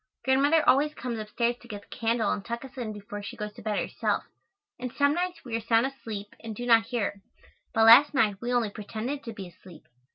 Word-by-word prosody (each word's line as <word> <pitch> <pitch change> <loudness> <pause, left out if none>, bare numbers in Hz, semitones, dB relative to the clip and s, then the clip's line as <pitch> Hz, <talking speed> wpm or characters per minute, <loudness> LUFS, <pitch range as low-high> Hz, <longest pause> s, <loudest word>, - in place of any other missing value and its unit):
Grandmother 285 +4 +3
always 295 +3 +4
comes 235 -2 -4
upstairs 235 +3 -1
to 240 - -16
get 205 -3 -7
the - - -12
candle 230 0 +1
and 200 - -2
tuck 235 +4 -5
us 265 0 -13
in 240 -4 -4
before 205 0 -7
she 205 - -8
goes 210 -1 -5
to - - -12
bed 210 -1 -1
herself, - - -1 0.6
and 250 -1 -4
some 285 +2 +2
nights 355 0 -3
we 235 -3 -3
are - - 0
sound 230 +2 +3
asleep 220 -7 -6
and 225 -2 -7
do 245 - -5
not 225 -2 +5
hear 240 -3 -1
her, 200 0 -4 0.5
but 225 0 +4
last 240 +6 +9
night 215 -8 +1
we 240 +1 -2
only 240 -4 +1
pretended 220 +7 -5
to 230 - -6
be 200 -4 -8
asleep. 175 0 -15
230 Hz, 230 wpm, -27 LUFS, 210-260 Hz, 0.6 s, last